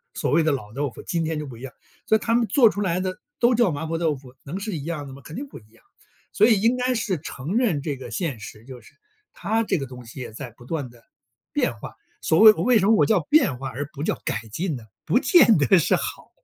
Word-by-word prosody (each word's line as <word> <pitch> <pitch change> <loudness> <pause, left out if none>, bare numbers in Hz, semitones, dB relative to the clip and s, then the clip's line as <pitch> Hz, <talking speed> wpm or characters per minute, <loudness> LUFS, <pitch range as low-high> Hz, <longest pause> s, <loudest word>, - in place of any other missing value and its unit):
所 - - -1
谓 165 - +4
的 155 -1 +2
老 110 -6 -4
豆 140 +1 -2
腐， - - -12
今 165 -2 -1
天 160 -1 -2
就 150 - -4
不 125 -4 -10
一 - - -14
样， 135 -2 -7 0.4
所 220 - +5
以 - - -11
他 230 - -1
们 235 -2 +2
做 245 -7 +5
出 205 - -4
来 180 -2 0
的 185 0 -3 0.2
都 240 +1 +4
叫 235 -4 +3
麻 150 +1 -4
婆 165 +1 -3
豆 160 -3 +1
腐， 130 -1 -14
能 170 +8 -6
是 205 -3 -4
一 140 - -5
样 155 -3 -4
的 135 - -10
吗？ 140 - -12
肯 155 - -10
定 280 +2 -5
不 - - -11
一 105 - -23
样， 115 0 -25 0.5
所 215 - +5
以 220 -4 +4
应 230 +4 +3
该 250 0 0
是 195 -7 -1
承 155 - -6
认 195 - +1
这 145 -3 -2
个 130 - -9
现 160 - -3
实， 110 +2 -11
就 130 -2 -11
是 - - -20 0.4
它 220 +5 -1
这 190 -4 0
个 135 - -4
东 125 -1 -11
西 125 - -10
也 120 -3 -7
在 125 +1 -7
不 120 +2 -17
断 145 -4 -4
地 120 -1 -20 0.5
变 - - 0
化。 - - -9 0.3
所 160 - +2
谓 220 0 +10
我 - - -3
为 245 -3 +4
什 195 - +1
么 225 - +5
我 - - +4
叫 220 - +3
变 255 - +3
化 135 -1 -4
而 140 +4 -5
不 145 - -8
叫 - - -1
改 110 - -2
进 165 - -2
呢？ 120 - -9 0.2
不 245 - +3
见 255 - +6
得 145 +7 +5
是 165 - +3
好。 - - -5
160 Hz, 305 characters per minute, -23 LUFS, 135-215 Hz, 0.5 s, 谓